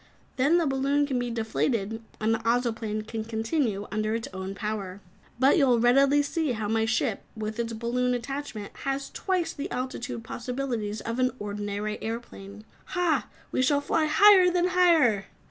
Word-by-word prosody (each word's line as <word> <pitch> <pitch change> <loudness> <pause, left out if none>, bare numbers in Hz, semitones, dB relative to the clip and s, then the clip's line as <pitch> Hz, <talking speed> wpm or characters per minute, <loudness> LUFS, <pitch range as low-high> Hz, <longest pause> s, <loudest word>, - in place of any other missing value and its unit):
Then 285 +6 +3
the 340 - +2
balloon 275 +1 +1
can 265 -3 -1
be 245 0 -2
deflated 225 -1 -1 0.2
and 220 +1 +2
the 225 - 0
Ozoplane 225 -2 -1
can 225 -1 -4
continue 225 -1 -1
under 215 +1 -1
its 230 - -3
own 190 +1 -5
power. 200 -3 -4 0.4
But 270 +7 +4
you 275 - +4
will 240 -2 +4
readily 275 +4 +4
see 305 -2 -1
how 215 -2 -3
my 220 +1 +1
ship, 220 0 0 0.2
with 215 +1 -4
its 230 -1 -2
balloon 245 +2 0
attachment, 245 -4 -5
has 275 0 -3
twice 370 -3 -1
the 285 - -5
altitude 250 -2 -4
possibilities 240 -3 -3
of 230 +2 -4
an 255 0 +3
ordinary 205 0 -4
airplane. 215 -2 -7 0.2
Hah! 355 -4 0 0.2
We - - +1
shall 285 +2 +3
fly 310 +2 +1
higher 385 +2 +7
than 355 0 +1
higher!" 325 - +4
235 Hz, 165 wpm, -27 LUFS, 220-275 Hz, 0.4 s, higher